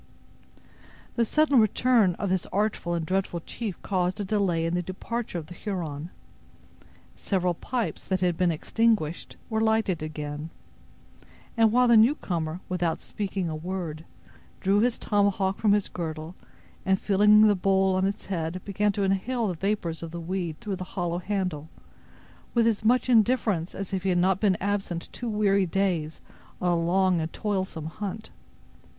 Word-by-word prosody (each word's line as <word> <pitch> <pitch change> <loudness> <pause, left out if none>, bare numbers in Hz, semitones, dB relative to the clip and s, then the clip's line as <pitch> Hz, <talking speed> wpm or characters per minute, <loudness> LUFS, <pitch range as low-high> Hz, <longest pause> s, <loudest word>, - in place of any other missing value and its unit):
The 235 - +2
sudden 295 +1 +3
return 220 -3 +3
of 200 - -3
this 185 -2 0
artful 200 -3 -1
and 165 -1 -2
dreaded 185 -2 -2
chief 215 -6 -5
caused 185 -1 0
a - - -1
delay 185 -5 +1
in 165 - -1
the 175 - +1
departure 190 +4 -4
of 165 - -5
the 175 - -10
Huron. 170 -6 -5 1.1
Several 180 -3 0
pipes, 240 +7 -3
that 190 -1 0
had 180 -2 +1
been 180 0 +2
extinguished, 190 -1 0
were 220 -1 -1
lighted 220 -6 +1
again; 150 0 -5 1.1
while 230 +2 +4
the 235 -1 +6
newcomer, 180 - +1
without 175 -3 -1
speaking 195 -3 -3
a 160 - -3
word, 165 -1 -5 0.6
drew 195 +2 +2
his 240 +2 +2
tomahawk 200 -2 +1
from 210 -2 +4
his 205 -1 +1
girdle, 160 -1 -5 0.5
and 190 0 +2
filling 210 +1 +5
the 210 - +5
bowl 190 0 +2
on 190 +1 +2
its 200 - -4
head 170 -2 -3
began 205 +1 +1
to 200 - -1
inhale 210 +4 0
the - - -1
vapors 175 -2 -2
of 165 - -5
the 170 +1 -6
weed 170 -2 -3
through 200 -2 -4
the 185 - -5
hollow 175 -1 -1
handle, 180 -6 -3 0.9
with 235 -1 +4
as 225 -2 +1
much 245 +3 +3
indifference 220 -7 +2
as 195 0 -6
if 190 - 0
he 190 - -1
had 180 - +2
not 185 +1 +2
been 200 -4 +2
absent 195 -4 -2
two 240 - -4
weary 200 -3 +2
days 170 -4 -1 0.4
on 180 - +1
a - - +3
long 175 +1 +2
and 160 0 -3
toilsome 190 -6 -2
hunt. 205 +6 -6
190 Hz, 165 wpm, -26 LUFS, 170-210 Hz, 1.1 s, the